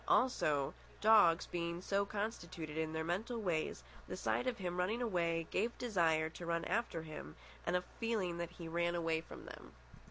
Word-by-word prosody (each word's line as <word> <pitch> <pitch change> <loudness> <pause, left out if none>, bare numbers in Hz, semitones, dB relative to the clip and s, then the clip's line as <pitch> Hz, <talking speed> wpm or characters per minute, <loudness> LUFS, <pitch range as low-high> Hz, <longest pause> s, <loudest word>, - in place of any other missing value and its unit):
Also, 150 - +3 0.3
dogs 210 -6 +6
being 170 0 -2
so 200 +2 +1
constituted 175 -8 -4
in 160 0 -1
their 160 0 -1
mental 205 +8 -1
ways, 175 -7 -1 0.2
the - - -4
sight 250 - 0
of 250 -2 0
him 180 -2 -3
running 195 +6 +1
away 170 -8 +1
gave 230 +4 0
desire 165 -9 +2
to 160 +2 -9
run 170 0 0
after 225 -8 0
him 150 - -8 0.3
and - - +2
a 180 - +2 0.2
feeling 205 -7 0
that 170 -1 -2
he 175 -1 -8
ran 170 +1 +1
away 165 -2 +1
from - - -10
them. - - -10
175 Hz, 180 wpm, -37 LUFS, 165-210 Hz, 0.3 s, dogs